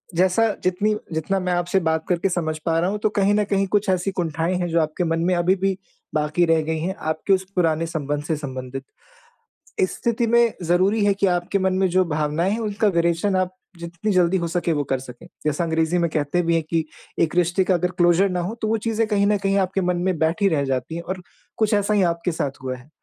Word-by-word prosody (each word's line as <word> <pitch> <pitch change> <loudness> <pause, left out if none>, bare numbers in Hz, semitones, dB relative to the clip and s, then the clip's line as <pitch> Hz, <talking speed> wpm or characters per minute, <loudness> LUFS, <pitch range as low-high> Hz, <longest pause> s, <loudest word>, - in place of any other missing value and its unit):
जैसा 185 +6 +3 0.2
जितनी 185 +4 +1 0.2
जितना 160 +5 -1
मैं 180 -1 -1
आपसे 175 +2 +1
बात 160 -2 -1
करके 180 +2 +1
समझ 160 -3 -2
पा 165 -1 +1
रहा 175 +2 +1
हूँ 210 +1 -3
तो 215 - +1
कहीं 200 +1 +3
न 210 - +3
कहीं 195 0 +2
कुछ 205 0 +1
ऐसी 185 +1 +1
कुंठाएँ 165 +1 -1
हैं 175 - -1
जो 165 0 +2
आपके 155 +3 -1
मन 165 -1 0
में 180 - +2
अभी 175 +2 +2
भी 195 0 -1 0.4
बाक़ी 155 +3 +2
रह 165 -1 +3
गई 160 +1 -2
हैं, 185 +5 -2
आपके 160 +5 0
उस 190 - +1
पुराने 165 -2 +1
संबंध 145 -2 -3
से 160 +1 -1
संबंधित। 130 -2 -6 1.0
इस 185 - +1
स्थिति 235 0 0
में 235 0 +4
ज़रूरी 185 +5 +2
है 200 - +4
कि 195 0 +1
आपके 180 +2 0
मन 190 0 +1
में 190 0 +3
जो 185 +1 +3
भावनाएँ 155 +5 0
हैं 220 - -1
उनका 215 0 0
विरेचन 170 +2 +1
आप 185 0 0 0.2
जितनी 175 +5 -4
जल्दी 180 0 +3
हो 170 -1 -2
सके 170 0 -1
वो 145 -1 0
कर 135 - +1
सकें। 125 -2 -11 0.2
जैसा 150 +3 0
अंग्रेज़ी 160 +1 +1
में 170 -1 +1
कहते 155 +3 0
भी 170 0 +1
हैं 165 - +1
कि 165 -1 +1 0.4
एक 165 +1 +1
रिश्ते 180 +2 +2
का 185 0 +1
अगर 180 +1 0
क्लोज़र 175 +3 +4
ना 180 -1 -1
हो 180 +5 -3
तो 220 - 0
वो 225 +1 +1
चीज़ें 225 0 +1
कहीं 205 -2 +2
न 210 0 +3
कहीं 195 0 0
आपके 190 0 0
मन 180 -1 0
में 185 -2 0
बैठी 165 +6 +2
रह 150 -4 +1
जाती 135 +4 -2
हैं 170 - -4
और 185 +1 -5 0.4
कुछ 215 -1 +1
ऐसा 205 +1 +2
ही 205 - +3
आपके 170 +1 0
साथ 145 -4 -2
हुआ 130 -1 -3
है। 125 +3 -17
175 Hz, 240 wpm, -22 LUFS, 160-195 Hz, 1.0 s, में